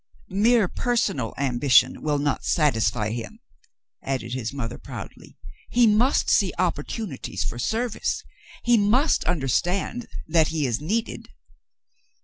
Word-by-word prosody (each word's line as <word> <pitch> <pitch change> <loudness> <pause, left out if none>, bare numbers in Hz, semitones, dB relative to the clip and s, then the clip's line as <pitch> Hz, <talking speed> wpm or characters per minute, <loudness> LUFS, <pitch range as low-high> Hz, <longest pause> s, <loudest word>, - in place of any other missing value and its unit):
"Mere 215 +2 +3
personal 200 - -1
ambition 130 -1 +3
will 150 -1 0
not 145 -1 -1
satisfy 115 - +1
him," 115 0 -6 0.6
added 130 -3 -3
his 120 -3 -3
mother, 130 -4 -5
proudly. - - -10 0.3
"He 240 0 +4
must 225 +5 +3
see - - +3
opportunities 135 - -3
for 120 - -4
service. 225 - -1 0.4
He 240 -2 +4
must 245 +10 +3
understand 180 - -1 0.2
that 160 -1 +3
he 155 -3 -1
is 120 0 -1
needed." 220 +9 -3
150 Hz, 120 wpm, -24 LUFS, -, 0.6 s, He